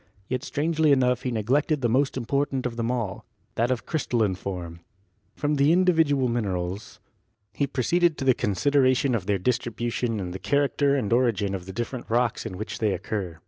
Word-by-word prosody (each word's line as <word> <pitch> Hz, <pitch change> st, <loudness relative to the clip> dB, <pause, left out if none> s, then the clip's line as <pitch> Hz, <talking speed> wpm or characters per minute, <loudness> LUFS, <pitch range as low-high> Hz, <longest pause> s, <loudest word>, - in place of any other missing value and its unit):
Yet 130 Hz, 0 st, -2 dB
strangely 155 Hz, 0 st, +1 dB
enough 125 Hz, -2 st, +3 dB
he 130 Hz, -, -2 dB
neglected 135 Hz, +7 st, +1 dB
the 120 Hz, -, +2 dB
most 130 Hz, +4 st, +1 dB
important 135 Hz, +1 st, -1 dB
of 120 Hz, -2 st, -2 dB
them 115 Hz, 0 st, -2 dB
all 115 Hz, -7 st, -3 dB, 0.2 s
— -, -, -42 dB
that 115 Hz, +2 st, 0 dB
of 130 Hz, -2 st, -1 dB
crystalline 120 Hz, -, 0 dB
form. 90 Hz, -3 st, -6 dB, 0.6 s
From 145 Hz, 0 st, 0 dB
the 140 Hz, +2 st, +4 dB
individual 160 Hz, -7 st, +3 dB
minerals 100 Hz, -4 st, -3 dB, 0.5 s
he 140 Hz, -, 0 dB
proceeded 165 Hz, +6 st, +1 dB
to 135 Hz, -, -3 dB
the 130 Hz, -, +6 dB
consideration 130 Hz, +5 st, +2 dB
of 100 Hz, -5 st, -2 dB
their 100 Hz, -1 st, +2 dB
distribution 120 Hz, +1 st, -1 dB
and 90 Hz, -2 st, -4 dB
the 95 Hz, -, -6 dB
character 140 Hz, 0 st, +1 dB
and 115 Hz, -5 st, 0 dB
origin 115 Hz, -6 st, +1 dB
of 95 Hz, -2 st, -5 dB
the -, -, -5 dB
different 120 Hz, +3 st, -5 dB
rocks 120 Hz, 0 st, 0 dB
in 90 Hz, -, -7 dB
which 105 Hz, 0 st, -5 dB
they 105 Hz, -3 st, +1 dB
occur. 95 Hz, -3 st, -4 dB
120 Hz, 185 wpm, -25 LUFS, 105-140 Hz, 0.6 s, the